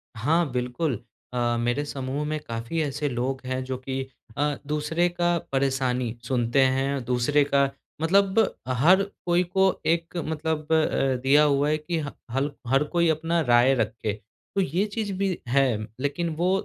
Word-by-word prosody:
हाँ, 150 +8 +1
बिल्कुल। 125 +4 -1 0.4
अ, 120 -1 +1
मेरे 120 +4 0
समूह 135 +1 -3
में 155 +1 -2
काफ़ी 115 +8 -3
ऐसे 145 0 -1
लोग 130 +2 -2
हैं, 130 0 -2
जो 130 0 -4
कि 130 +1 -4 0.3
अ, 145 0 +1
दूसरे 150 +3 +1
का 175 0 +1
परेशानी 130 -3 0
सुनते 120 0 +1 0.2
हैं। 135 0 -1
दूसरे 125 +4 +2
का 140 -1 +2 0.3
मतलब 195 +5 +3 0.3
हर 160 +10 +4 0.2
कोई 175 +1 +3
को 190 +2 +2 0.2
एक 170 +1 0
मतलब 160 -1 -2
अ, 155 -4 +2
दिया 145 +3 +5
हुआ 145 0 +3
है 155 - +2
कि 165 +2 -3
ह - - -6 0.2
हल 135 +3 0 0.2
हर 135 +3 +3
कोई 170 -1 +4
अपना 165 +2 +1
राय 120 +3 +6
रखे। 110 -2 -1 0.4
तो 195 - +3
ये 185 +4 0
चीज़ 215 -3 -2
भी 195 -2 0
है। 130 -2 +3 0.2
लेकिन 145 +5 -1
वो 175 +3 +1
145 Hz, 160 wpm, -25 LUFS, 130-165 Hz, 0.4 s, राय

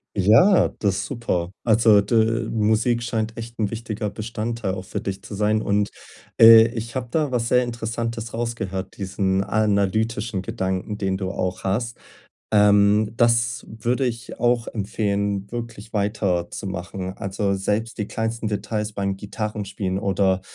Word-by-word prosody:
Ja, 110 - +5
das 100 -3 0
ist 100 - -2
super. 95 -9 -2
Also 110 -2 +5
d 115 +1 +1
Musik 110 +2 +2
scheint 115 -1 -2
echt 115 0 -8
'n 105 -2 -1
wichtiger 110 -2 -4
Bestandteil 110 -1 -3
auch 95 - -7
für 105 - -4
dich 100 0 -5
zu 110 - -9
sein. 105 +1 +1
Und, 100 0 +1 0.5
äh, 115 0 +10
ich 115 0 -6
habe 130 -2 -2
da 150 +1 0
was 120 -2 0
sehr 125 +1 +4
Interessantes 115 -1 -4
rausgehört, 110 -5 -4
diesen 95 -1 0
analytischen 105 0 0
Gedanken, 95 -1 -3
den 95 -1 0
du 95 -1 -3
auch 90 -1 -3
hast. 115 +5 -1 0.6
Ähm, 105 +1 +4
das 115 -1 +2
würde 120 +4 -1
ich 120 0 -5
auch 120 0 +2
empfehlen, 100 -1 -2
wirklich 115 -2 -7
weiterzumachen. 95 -2 -2
Also, 100 +1 -1
selbst 105 +5 -2
die 105 - -2
kleinsten 115 0 -3
Details 105 0 -3
beim 100 -1 -2
Gitarrenspielen 100 -2 -4
oder 95 -1 +1
105 Hz, 145 wpm, -23 LUFS, 100-115 Hz, 0.6 s, äh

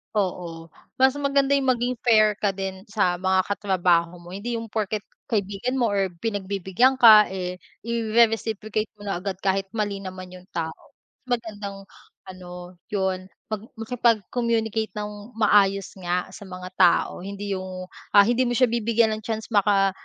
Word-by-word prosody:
Oo. 175 -4 -2 0.3
Mas 265 +1 +5
maganda 280 -1 +2
yung 265 -2 +3
maging 245 +1 -1
fair 215 -3 +5
ka 205 -1 0
din 190 0 -5
sa 205 -5 0
mga 190 +1 +1
katrabaho 180 -4 +1
mo, 175 +2 -10
hindi 230 +3 -3
yung 225 - -7
porket 215 -1 -2 0.3
kaibigan 210 +5 -1
mo 235 - +3
or 195 -3 0
pinagbibigyan 205 +4 +1
ka, 215 -4 +8
eh 180 -1 -4 0.2
ire-reciprocate 225 -2 0
mo 205 - -9
na 195 - -1
agad 190 -2 -4
kahit 195 0 -1
mali 205 -3 -2
naman 185 -1 -7
yung 180 - -13
tao. 165 - -5 0.3
Magandang 210 -5 -4 0.4
ano, 180 -1 -10 0.2
yun, 190 -2 -2 0.2
mag 215 -1 -4 0.2
makipag-communicate 225 -1 0
nang 210 +2 -7
maayos 200 -3 +2
nga 180 0 -1
sa 200 - -10
mga 185 -1 -8
tao 175 +1 +3
hindi 200 0 -4
yung, 185 -1 -6 0.2
ah, 200 -1 +8
hindi 245 +2 +2
mo 245 - -1
siya 255 0 +4
bibigyan 230 -1 +2
ng 215 - -9
chance 220 0 -4
maka 200 -2 +3
205 Hz, 155 wpm, -24 LUFS, 190-225 Hz, 0.4 s, ka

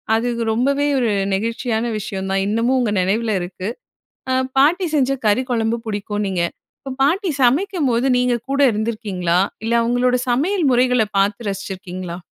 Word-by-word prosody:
அது 230 +2 0 0.2
ரொம்பவே 280 +5 +1
ஒரு 240 -4 +1 0.2
நெகிழ்ச்சியான 225 +2 -1
விஷயம் 195 -2 -4
தான். 195 0 +1
இன்னமும் 230 +5 +1
உங்க 235 -4 0
நினைவில 215 +4 0
இருக்கு. 185 +2 -5 0.6
அ - - +2 0.2
பாட்டி 340 +7 +4
செஞ்ச 270 -2 +2
கறி 215 +5 +3
குழம்பு 225 0 0
புடிக்கும்னீங்க. 205 -3 -2 0.4
இப்ப 270 -2 -6
பாட்டி 360 +6 +1
சமைக்கும்போது 270 - +2
நீங்க 250 0 +2 0.2
கூட 275 +1 +1
இருந்திருக்கீங்களா? 205 -5 -1 0.2
இல்ல 225 +1 -1
அவுங்களோட 245 +1 +2
சமையல் 325 +8 +1
முறைகள 250 -1 +3
பார்த்து 205 +3 0
ரசிச்சிருக்கீங்களா? 185 -2 -6
230 Hz, 135 wpm, -20 LUFS, 205-255 Hz, 0.6 s, பாட்டி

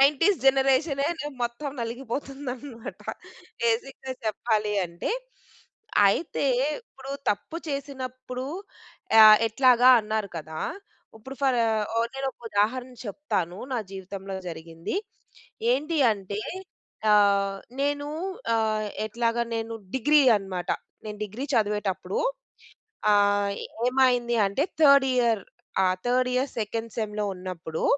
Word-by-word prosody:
90స్ 300 +8 +4
జనరేషనే 270 +2 +3
నే 295 - -4 0.2
మొత్తం 240 +5 -3
నలిగిపోతుందనమాట. 255 +1 -6 0.6
బేసిక్‌గా 260 +3 -1
చెప్పాలి 215 -1 0
అంటే, 170 +2 -4 1.0
అయితే 295 +8 -1 0.4
ఇప్పుడు 270 - -12 0.2
తప్పు 210 +10 -3
చేసినప్పుడు 255 -2 -5 0.8
ఆహ్, 215 -1 +10
ఎట్లాగా 250 +1 +5
అన్నారు 215 -1 -2
కదా. 155 0 -6 0.6
ఇప్పుడు 265 +5 -9
ఫర్ 260 -2 +3 0.6
నేను 270 0 -3
ఒక - - -57
ఉదాహరణ 245 +5 0
చెప్తాను, 190 - -2
నా 250 - +1
జీవితంలో 195 0 -7
జరిగింది. 165 - -6 0.8
ఏంటి 305 +5 0
అంటే 200 +1 -5 0.7
ఆహ్, 200 -1 +4 0.2
నేను 285 +1 0 0.5
ఆహ్, 215 -1 0 0.2
ఎట్లాగా 235 +1 0
నేను 225 0 -4 0.2
డిగ్రీ 295 +4 +5 0.2
అన్నమాట. 190 -3 -4 0.4
నేను 210 -1 -6
డిగ్రీ 225 +7 -6
చదివేటప్పుడు 205 -4 0 0.9
ఆహ్, 205 0 +3 0.3
ఏమైంది 250 -2 +3
అంటే 200 +9 0 0.2
థర్డ్ 280 -3 +7
ఇయర్ 230 -5 +2 0.4
ఆహ్, 185 0 +2
థర్డ్, 250 +1 +2 0.3
సెకండ్ 225 +1 -3
సెమ్‌లో 210 -2 -2
ఉన్నప్పుడు 180 -3 -5
230 Hz, 100 wpm, -26 LUFS, 205-265 Hz, 1.0 s, ఆహ్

